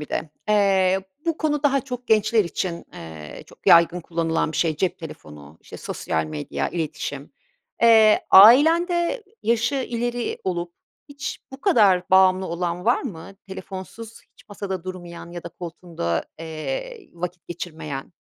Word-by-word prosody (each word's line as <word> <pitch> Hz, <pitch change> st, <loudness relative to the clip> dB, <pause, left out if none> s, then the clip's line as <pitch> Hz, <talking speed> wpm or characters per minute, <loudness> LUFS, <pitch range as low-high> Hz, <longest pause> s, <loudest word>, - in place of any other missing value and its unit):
bir 150 Hz, -, -7 dB
de, 160 Hz, -, -3 dB, 0.2 s
eee, 195 Hz, -2 st, +3 dB, 0.3 s
bu 330 Hz, -2 st, 0 dB
konu 295 Hz, -2 st, 0 dB
daha 275 Hz, -2 st, +3 dB
çok 250 Hz, -2 st, -7 dB
gençler 220 Hz, 0 st, +3 dB
için, 170 Hz, 0 st, -4 dB
eee, 80 Hz, -2 st, -9 dB
çok -, -, -20 dB
yaygın 170 Hz, +1 st, +6 dB
kullanılan 165 Hz, -1 st, -1 dB
bir -, -, -5 dB
şey; 160 Hz, -3 st, +1 dB
cep 185 Hz, +3 st, -1 dB
telefonu, 75 Hz, -, -11 dB
işte, -, -, -11 dB
sosyal 80 Hz, 0 st, -3 dB
medya, 75 Hz, -1 st, -4 dB
iletişim. 150 Hz, -4 st, -5 dB, 0.5 s
Eee, 220 Hz, -2 st, +6 dB
ailende 335 Hz, -, +6 dB, 0.2 s
yaşı 235 Hz, +4 st, +1 dB
ileri 240 Hz, -2 st, -2 dB
olup 175 Hz, -2 st, -3 dB, 0.4 s
hiç 285 Hz, 0 st, -6 dB
bu 265 Hz, -, -10 dB
kadar 205 Hz, -, +3 dB
bağımlı 190 Hz, 0 st, +5 dB
olan 175 Hz, +1 st, -3 dB
var 240 Hz, -, +2 dB
mı? 195 Hz, -, -8 dB
Telefonsuz 195 Hz, +4 st, -9 dB
hiç -, -, -23 dB
masada 195 Hz, -3 st, -5 dB
durmayan 175 Hz, -2 st, -8 dB
ya 175 Hz, 0 st, -7 dB
da 170 Hz, -, -7 dB
koltuğunda, 165 Hz, -, -4 dB
eee, 415 Hz, -, -6 dB
vakit 175 Hz, +1 st, -6 dB
geçirmeyen? 160 Hz, -4 st, -6 dB
185 Hz, 140 wpm, -23 LUFS, 165-230 Hz, 0.5 s, yaygın